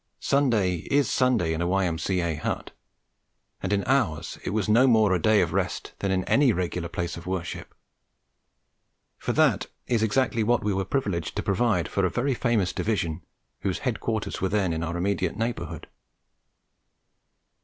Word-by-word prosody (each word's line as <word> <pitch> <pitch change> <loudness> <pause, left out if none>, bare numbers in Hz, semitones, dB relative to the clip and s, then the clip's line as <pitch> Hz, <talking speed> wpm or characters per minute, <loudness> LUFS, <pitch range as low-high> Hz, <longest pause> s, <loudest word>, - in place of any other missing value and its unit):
Sunday 115 -10 +2
is 145 0 +3
Sunday 125 -11 +2
in 80 - -2
a 85 - 0
Y.M.C.A. 90 -2 0
hut, 80 - -3 0.9
and 95 - -2
in 100 -1 +1
ours 95 - 0
it - - -3
was 105 0 -1
no 115 +5 +5
more 110 -5 +4
a 90 - +1
day 110 +1 +4
of - - -1
rest - - -2
than 100 - -1
it 95 - +2
is - - +1
in 95 - -2
any 140 -2 +4
regular 90 -3 -2
place 85 0 -3
of 85 - -10
worship; 90 -2 -4 1.4
for - - -2
that - - +2 0.2
is 115 -3 +1
exactly 115 +2 +1
what 120 +2 +2
we 105 -1 +1
were 95 0 -1
privileged 95 - -2
to - - -2
provide 100 -3 +1
for 100 - -1
a 90 - +3
very 130 +6 0
famous 115 -6 +1
Division 85 -8 -1 0.4
whose 95 -2 -1
headquarters 110 -3 -2
were 95 - +1
then 95 -4 +1
in 80 - -2
our 85 +1 -3
immediate 95 -1 -1
neighbourhood. 115 +1 -3
100 Hz, 170 wpm, -26 LUFS, 90-115 Hz, 1.4 s, no